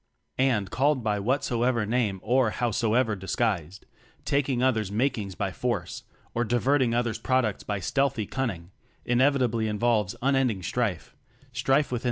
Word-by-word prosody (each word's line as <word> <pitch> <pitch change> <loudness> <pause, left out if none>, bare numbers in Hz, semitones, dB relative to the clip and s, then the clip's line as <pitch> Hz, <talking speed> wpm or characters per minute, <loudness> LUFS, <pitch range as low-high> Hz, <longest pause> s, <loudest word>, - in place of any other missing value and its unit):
And, 115 -8 +1
called 135 -1 +1
by 105 -2 0
whatsoever 120 0 0
name 110 -4 0
or 125 0 +3
how 120 +2 -1
soever 115 +1 +1
disguised, 95 -2 -2 0.4
taking 135 -3 +1
others' 110 -6 +1
mak 125 +6 +1
ings 100 -3 -6
by 100 0 -2
force, 120 +3 -3 0.3
or 120 - 0
diverting 120 +1 +2
others' 120 -2 -1
products 130 -6 0
by 105 -1 -3
stealthy 120 +3 0
cunning, 100 -11 -4 0.3
inevit 130 +2 +3
ably 115 -2 0
involves 105 -2 +1
unending 130 -8 +1
strife; 105 -5 -2 0.4
strife 135 +4 +1
within 125 - -1
120 Hz, 145 wpm, -26 LUFS, 105-130 Hz, 0.4 s, or